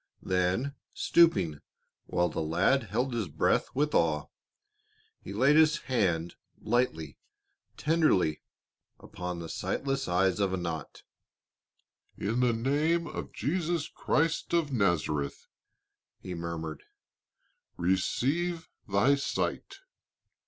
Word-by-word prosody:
Then 95 +9 0 0.2
stooping, 95 - +3 0.5
while 90 0 +1
the - - -3
lad 90 - +2
held 120 +6 -1
his 115 -5 -1
breath 75 - +1
with 150 +2 +1
awe, 75 -2 +1 0.9
he - - -8
laid 130 +8 +4
his 155 -1 +5
hand 90 -9 0 0.3
lightly, 95 -11 -1 0.6
tenderly, 150 - +2 0.6
upon 90 -1 -6
the 85 -1 -6
sightless 135 +10 -2
eyes 90 +2 +2
of 100 -2 +1
Anat. 85 -5 -5 1.1
"In 110 +5 -1
the 125 -1 +3
name 145 +8 +1
of - - -6
Jesus 165 - -1
Christ 160 +2 0
of 155 -5 +1
Nazareth," 80 - 0 0.7
he 90 - -7
murmured, 85 -2 -5 1.0
"receive 140 - 0 0.2
thy 100 +8 +3
sight." 140 - -2
105 Hz, 105 wpm, -29 LUFS, 85-140 Hz, 1.1 s, his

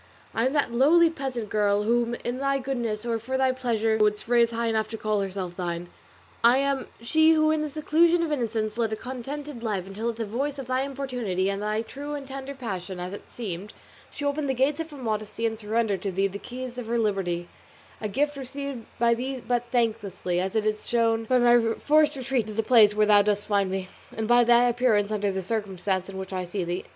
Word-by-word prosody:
I 230 +3 +2
am 265 - -2
that 285 -5 +1
lowly 320 +7 +5
peasant 260 -8 -4
girl 205 -1 +2
whom 235 +2 +1
thou - - -3
in 245 +1 -3
thy 275 0 +1
goodness 240 -5 -3
or 230 -1 -1
for 260 +4 -3
thy 265 0 +3
pleasure 225 -4 0
wouldst 210 0 +2
raise 235 -1 +4
high 235 0 -2
enough 220 -1 0
to 225 - -6
call 215 -1 0
herself 190 -2 -4
thine; 175 -1 -4 0.5
I 240 +2 +6
am 275 -1 0
she 315 +7 +4
who 310 -1 +3
in 315 -1 +1
the 305 - -2
seclusion 330 +3 +3
of 325 - -2
innocence 225 -5 -1
led 225 -2 +1
a - - 0
contented 265 +3 -6
life 205 -6 -2
until 210 +4 -3
at 230 - -3
the 225 0 -3
voice 270 +7 -2
of 270 - -5
thy 255 +1 0
importunity, 250 -9 -2
and 200 0 -4
thy 215 +1 -1
true 285 +5 -6
and 280 -2 -7
tender 270 +1 -6
passion, 190 -7 -5
as 180 +2 -5
it 205 - -9
seemed, 205 -3 -6 0.4
she 290 - -6
opened 285 0 -1
the 265 - +1
gates 275 +5 +1
of 325 0 -4
her 295 - -10
modesty 220 -2 -3
and 225 -1 -1
surrendered 215 -2 0
to 200 - -2
thee 195 +2 +1
the 195 +1 -3
keys 250 +1 -7
of 235 - -6
her 235 +1 0
liberty; 190 -6 -1 0.5
a 215 - -1
gift 290 +7 0
received 275 -2 -6
by 235 0 +4
thee 260 +3 -3
but 245 -1 +1
thanklessly, 210 -7 0
as 190 +3 -2
is 220 - +3
clearly 215 0 +1
shown 225 0 +1
by 255 +3 +3
my 240 -2 +4
forced 305 0 +3
retreat 260 -4 -1
to 215 - -6
the 225 +2 0
place 215 -3 +6
where 215 0 +4
thou 210 -1 +6
dost 205 0 0
find 200 -2 +2
me, 190 0 -3 0.3
and 220 -1 -1
by 240 +1 +6
thy 240 0 +5
appearance 235 -4 +2
under 205 -1 0
the 190 0 -3
circumstances 195 -2 -2
in 190 - -7
which 190 0 -6
I 185 -1 -2
see 180 +2 -3
thee. 175 +1 -3
230 Hz, 230 wpm, -26 LUFS, 205-265 Hz, 0.5 s, I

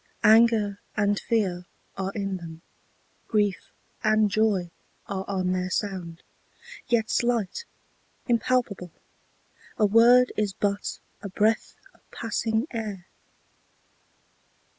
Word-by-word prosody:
Anger 220 -2 +5 0.2
and 205 -1 +2
fear 185 -6 -1 0.3
are 190 0 -3
in 195 -2 -2
them; 165 -2 -10 0.6
grief 205 -3 0 0.3
and 215 -1 +3
joy 200 -5 +1 0.3
Are 195 -1 -4
on 185 -2 -1
their 185 0 -1
sound; 185 -4 -4 0.6
yet 225 -2 +1
slight, 240 - 0 0.6
impalpable: 235 -6 0 0.9
A 215 - +4
word 235 +4 +6
is 210 -2 -1
but 200 0 -2 0.2
a 200 - -6
breath 215 +4 +1 0.2
of - - -28
passing 225 +1 -1
air. 210 -6 -5
205 Hz, 100 wpm, -26 LUFS, 190-225 Hz, 0.9 s, word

